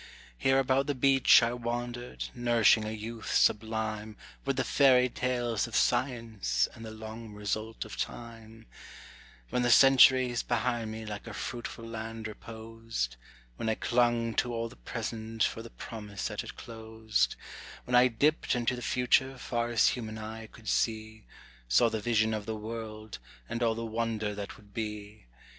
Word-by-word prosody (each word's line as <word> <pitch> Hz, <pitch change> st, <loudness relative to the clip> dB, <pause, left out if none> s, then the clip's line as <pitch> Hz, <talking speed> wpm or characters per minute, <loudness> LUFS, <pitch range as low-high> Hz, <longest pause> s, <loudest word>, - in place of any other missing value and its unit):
Here 135 Hz, -, +2 dB
about 135 Hz, +1 st, +2 dB
the 145 Hz, -, 0 dB
beach 135 Hz, -1 st, +6 dB
I 115 Hz, +1 st, +1 dB
wandered, 120 Hz, 0 st, -4 dB
nourishing 120 Hz, -2 st, +4 dB
a -, -, -3 dB
youth 110 Hz, +1 st, -5 dB
sublime 110 Hz, 0 st, +1 dB, 0.3 s
With 135 Hz, -1 st, 0 dB
the 130 Hz, -, +1 dB
fairy 130 Hz, -3 st, +5 dB
tales 120 Hz, -3 st, -1 dB
of 115 Hz, -, -7 dB
science, 115 Hz, -, +1 dB
and 115 Hz, -, -11 dB
the 110 Hz, -, -6 dB
long 110 Hz, 0 st, -8 dB
result 110 Hz, +2 st, -3 dB
of -, -, -8 dB
time; 115 Hz, -1 st, -7 dB, 0.9 s
When 125 Hz, -, +1 dB
the 120 Hz, -, +2 dB
centuries 130 Hz, -1 st, +6 dB
behind 120 Hz, -1 st, -1 dB
me 110 Hz, 0 st, -6 dB
like 105 Hz, -1 st, -7 dB
a -, -, -7 dB
fruitful 120 Hz, -1 st, -5 dB
land 115 Hz, -1 st, -6 dB
reposed; 110 Hz, -, -5 dB, 0.4 s
When 110 Hz, -, -2 dB
I 110 Hz, -, +1 dB
clung 120 Hz, -1 st, +1 dB
to 120 Hz, -, +1 dB
all 115 Hz, 0 st, -2 dB
the -, -, -14 dB
present 110 Hz, -, -4 dB
for 115 Hz, -, 0 dB
the 115 Hz, -, -10 dB
promise 105 Hz, -5 st, -6 dB
that -, -, -4 dB
it -, -, -10 dB
closed; 110 Hz, -, -2 dB, 0.5 s
When 125 Hz, -, -5 dB
I 125 Hz, +1 st, +7 dB
dipt 145 Hz, +5 st, +1 dB
into 125 Hz, +1 st, 0 dB
the 120 Hz, -, -7 dB
future 130 Hz, +2 st, +2 dB
far 120 Hz, -1 st, -2 dB
as 120 Hz, -2 st, +4 dB
human 110 Hz, -3 st, -4 dB
eye 110 Hz, +1 st, -7 dB
could 110 Hz, 0 st, -16 dB
see, 110 Hz, 0 st, -1 dB, 0.4 s
Saw -, -, +4 dB
the 110 Hz, -, -2 dB
vision 110 Hz, 0 st, +2 dB
of 105 Hz, -1 st, -4 dB
the 110 Hz, -, -2 dB
world, 110 Hz, -1 st, -7 dB, 0.3 s
and 115 Hz, -, -4 dB
all 115 Hz, -1 st, +2 dB
the 115 Hz, 0 st, -4 dB
wonder 110 Hz, -2 st, -2 dB
that 100 Hz, -1 st, -7 dB
would 100 Hz, -2 st, -20 dB
be. 105 Hz, -, -6 dB
115 Hz, 165 wpm, -30 LUFS, 110-120 Hz, 0.9 s, I